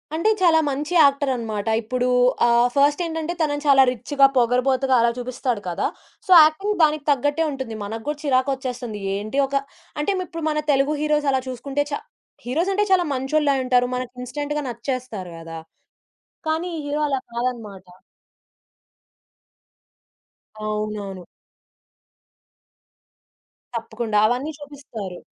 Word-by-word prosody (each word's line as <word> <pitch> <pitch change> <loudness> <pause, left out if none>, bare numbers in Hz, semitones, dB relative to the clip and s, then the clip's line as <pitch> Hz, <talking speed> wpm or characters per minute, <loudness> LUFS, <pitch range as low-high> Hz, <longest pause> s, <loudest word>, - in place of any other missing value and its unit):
అంటే 335 +7 +2
చాలా 335 -3 +5
మంచి 295 +5 -3
యాక్టరన్నమాట 255 -7 0
ఇప్పుడు 250 +3 -1 0.4
ఆహ్, 235 +1 +4
ఫస్ట్ 290 +4 +3
ఏంటంటే 325 +1 -3
తనని 290 -1 0
చాలా 270 -1 +7
రిచ్‌గా 275 +3 +3
పొగరుబోతుగా 255 +2 +2
అలా 235 0 +3
చూపిస్తాడు 245 -2 -3
కదా! 170 - -1 0.4
సో 375 - -3
యాక్టింగ్ 390 +7 +1
దానికి 305 -1 +2
తగ్గట్టే 290 +4 +1
ఉంటుంది. 265 -5 -5
మన 220 +3 -5
గూడా 295 0 -2
చిరాకొచ్చేస్తుంది. 255 -5 -1 0.2
ఏంటి 215 +7 -3
ఒక 275 - -4 0.5
అంటే 300 - 0
మీప్పుడు 330 -3 -6
మన 300 - 0
తెలుగు 275 +2 +2
హీరోస్ 300 -1 +1
అలా 265 - +1
చూసుకుంటే 270 +3 -2
చ - - -3 0.5
హీరోసంటే 360 +11 +1
చాలా 360 -2 +4
మంచోళ్ళే 280 +2 +1
అంటారు. 250 -1 +2
మనకు 250 -1 -4
ఇన్‌స్టంట్‌గా 295 +3 -3
నచ్చేస్తారు 235 -6 -5
గదా! 165 0 -8 0.9
కానీ 320 +3 -1
ఈ - - -4
హీరో 295 +1 -1
అలా 270 -2 0
కాదన్నమాట. 230 -6 -4 2.8
అవునవును. 210 -3 -4 2.5
తప్పకుండా 225 -1 -2
అవన్నీ 255 +6 -1
చూపిస్తారు. 265 -11 -8
265 Hz, 120 wpm, -22 LUFS, 235-295 Hz, 2.8 s, చాలా